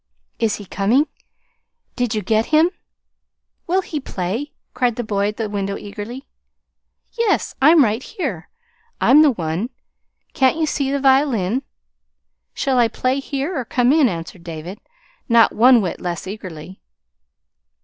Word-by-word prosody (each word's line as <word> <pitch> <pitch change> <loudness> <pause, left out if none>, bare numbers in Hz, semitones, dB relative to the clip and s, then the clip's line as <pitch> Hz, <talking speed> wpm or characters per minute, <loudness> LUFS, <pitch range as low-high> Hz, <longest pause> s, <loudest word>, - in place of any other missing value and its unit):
"Is 225 -3 +1
he 205 - -9
coming? 220 +10 +2 0.9
Did 245 -3 -1
you 210 - -2
get 220 0 +1
him? 320 +3 +4 1.0
Will 375 +2 +1
he 310 - -4
play?" 225 +4 -4 0.2
called 250 -2 0
the 240 - -3
boy 205 -2 0
at 210 - -4
the 225 - -2
window 200 -1 -3
eagerly. 210 +6 -8 0.9
"Yes, 465 -3 0
I'm 310 +2 +7
right 220 +1 0
here. 240 - -5 0.5
I'm 295 +3 +6
the 310 - +6
one. 180 - -2 0.6
Can't 265 +3 +2
you 320 - +1
see 280 -3 -1
the 280 0 0
violin? 265 -5 +2 0.9
Shall 265 -2 +1
I 235 - +5
play 255 +4 -1
here 280 +5 -3
or 260 - -1
come 245 +2 +2
in?" 300 -5 +4
answered 170 0 -7
David, 170 +3 -7 0.5
not 230 -1 +5
one 240 0 +5
whit 180 - -4
less 175 0 -4
eagerly. 185 -3 -9
235 Hz, 145 wpm, -20 LUFS, 200-275 Hz, 1.0 s, I'm